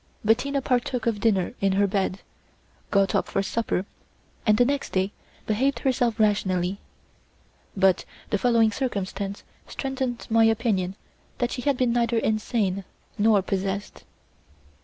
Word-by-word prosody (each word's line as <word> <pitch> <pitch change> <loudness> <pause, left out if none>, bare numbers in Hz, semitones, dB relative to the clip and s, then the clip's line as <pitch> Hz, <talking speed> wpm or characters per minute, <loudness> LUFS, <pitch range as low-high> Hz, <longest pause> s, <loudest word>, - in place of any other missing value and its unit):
Bettina 270 +5 +2
partook 250 -2 0
of 225 -3 0
dinner 200 -1 +1
in 195 -1 +2
her 200 +1 +3
bed, 195 -1 -1 0.7
got 195 -1 +2
up - - +1
for 195 - 0
supper, 205 -3 -1 0.6
and 210 0 +5
the 245 - +5
next 280 +1 -2
day 190 +1 +1 0.3
behaved 260 +6 +1
herself 245 -4 0
rationally; 195 -3 +1 1.0
but 190 -1 +4 0.3
the 205 - +1
following 230 0 +4
circumstance 200 -4 -3 0.2
strengthened 265 -3 -3
my 225 0 +4
opinion 210 -5 +1 0.4
that 245 0 -1
she 250 - -3
had 280 0 +1
been 250 -2 +2
neither 235 -1 +1
insane 215 -3 0 0.4
nor 210 -2 +4
possessed. 195 +1 -3
215 Hz, 135 wpm, -25 LUFS, 195-245 Hz, 1.0 s, and